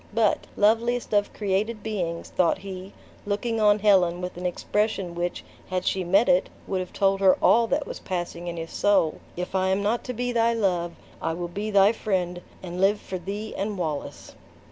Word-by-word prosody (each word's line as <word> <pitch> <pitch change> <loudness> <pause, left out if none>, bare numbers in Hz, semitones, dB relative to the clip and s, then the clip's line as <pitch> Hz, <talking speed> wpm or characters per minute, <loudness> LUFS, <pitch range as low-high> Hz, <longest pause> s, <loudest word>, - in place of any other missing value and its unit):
But, 225 -2 +2
loveliest 230 +3 +2
of 205 0 +2
created 210 +2 -1
beings," 175 -6 -3
thought 175 -3 +2
he, 190 0 -8 0.3
looking 220 +2 -1
on 210 -1 +5
Helen 190 -4 +3
with 180 0 -5
an 180 +1 -2
expression 195 0 -1
which, 175 +1 -3 0.3
had 185 -1 -2
she 190 - 0
met 195 +6 +3
it, 270 0 +3 0.2
would 190 - -1
have 180 -1 -5
told 195 0 +2
her 190 -1 +5
all 230 +1 +5
that 290 +5 0
was - - -7
passing 175 -2 -4
in 170 0 -4
his 165 0 -6
soul, 200 -6 +2 0.2
"if 180 +1 -4
I 190 0 +1
am 190 +1 +1
not 225 +4 0
to 250 - -3
be 245 +1 -2
thy 230 0 +2
love, 175 -6 0 0.3
I 165 - -1
will 175 +1 -4
be 205 +5 -4
thy 200 0 +6
friend 180 -5 -2 0.2
and 180 0 -5
live 205 +2 +4
for 185 - -6
thee 205 +4 -5
and 200 +1 -2
Wallace!" 155 -5 -4
195 Hz, 195 wpm, -25 LUFS, 180-215 Hz, 0.3 s, thy